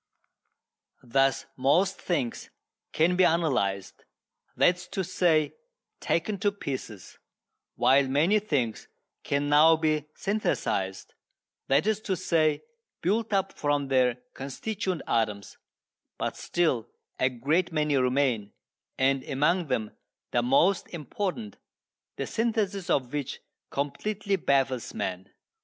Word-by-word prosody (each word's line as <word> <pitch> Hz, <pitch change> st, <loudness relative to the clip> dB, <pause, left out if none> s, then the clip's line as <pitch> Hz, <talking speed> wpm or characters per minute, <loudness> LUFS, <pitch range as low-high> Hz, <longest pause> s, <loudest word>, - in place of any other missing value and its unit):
Thus 135 Hz, +2 st, +2 dB
most 165 Hz, +9 st, +2 dB
things 130 Hz, -10 st, -2 dB, 0.4 s
can 170 Hz, +3 st, +2 dB
be 185 Hz, -, +4 dB
analysed 130 Hz, -, 0 dB, 0.5 s
that 180 Hz, -, +5 dB
is 180 Hz, 0 st, -11 dB
to 190 Hz, -, -3 dB
say, 170 Hz, -4 st, +2 dB, 0.5 s
taken 195 Hz, +4 st, -1 dB
to 205 Hz, 0 st, +2 dB
pieces 130 Hz, -, -7 dB, 0.6 s
while 130 Hz, +3 st, +4 dB
many 160 Hz, +11 st, +3 dB
things 135 Hz, -, -2 dB, 0.3 s
can 140 Hz, +1 st, -1 dB
now 155 Hz, +3 st, +6 dB
be 155 Hz, -2 st, 0 dB
synthesised 95 Hz, -, -2 dB, 0.5 s
that 140 Hz, +6 st, +3 dB
is 215 Hz, 0 st, +1 dB
to 195 Hz, -3 st, -1 dB
say, 160 Hz, -4 st, +1 dB, 0.4 s
built 220 Hz, +5 st, +1 dB
up 195 Hz, -1 st, +1 dB
from 145 Hz, -2 st, -1 dB
their 125 Hz, -2 st, +3 dB, 0.2 s
constituent 185 Hz, -, -4 dB
atoms 105 Hz, -4 st, -1 dB, 0.6 s
but -, -, -2 dB
still 135 Hz, -10 st, 0 dB, 0.3 s
a 130 Hz, -, +3 dB
great 145 Hz, +9 st, 0 dB
many 150 Hz, -2 st, +1 dB
remain, 125 Hz, -5 st, +1 dB, 0.4 s
and 135 Hz, 0 st, +2 dB
among 150 Hz, +5 st, +1 dB
them 115 Hz, -5 st, -1 dB, 0.4 s
the 120 Hz, -, +2 dB
most 140 Hz, +10 st, +3 dB
important, 195 Hz, -, -4 dB, 0.6 s
the -, -, -3 dB
synthesis 215 Hz, -5 st, -1 dB
of 130 Hz, -1 st, 0 dB
which 145 Hz, -2 st, -3 dB, 0.3 s
completely 200 Hz, +8 st, -2 dB
baffles 135 Hz, -, 0 dB
man. 90 Hz, +1 st, -4 dB
150 Hz, 115 wpm, -27 LUFS, 130-185 Hz, 0.6 s, now